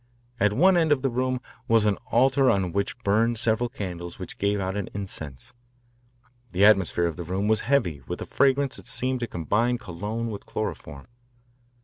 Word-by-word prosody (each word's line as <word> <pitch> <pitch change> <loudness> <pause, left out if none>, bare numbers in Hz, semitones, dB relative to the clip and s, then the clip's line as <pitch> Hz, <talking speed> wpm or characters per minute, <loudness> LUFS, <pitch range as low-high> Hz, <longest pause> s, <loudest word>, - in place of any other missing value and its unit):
At 105 -1 +3
one 180 - +5
end 160 -2 +2
of 140 -2 +2
the 135 - +1
room 130 +1 -1 0.3
was 115 -2 +4
an 105 -2 +2
altar 135 +2 +4
on 95 -3 +1
which 100 +5 -2
burned 115 +4 +2
several 115 +1 +1
candles 85 -5 -6
which - - -8
gave 100 0 +1
out 95 0 -2
an 100 -2 -3
incense. 75 -10 -7 1.0
The 95 +3 +4
atmosphere 95 -4 +4
of 85 -2 -2
the 85 - -4
room 95 +5 -2
was 110 0 +2
heavy 110 - +1
with - - -4
a - - -5
fragrance 140 0 +2
that - - -10
seemed 130 0 0
to 120 - -3
combine 110 +8 0
cologne 110 +2 -4
with 100 - -8
chloroform. 70 -1 -5
105 Hz, 185 wpm, -25 LUFS, 95-125 Hz, 1.0 s, one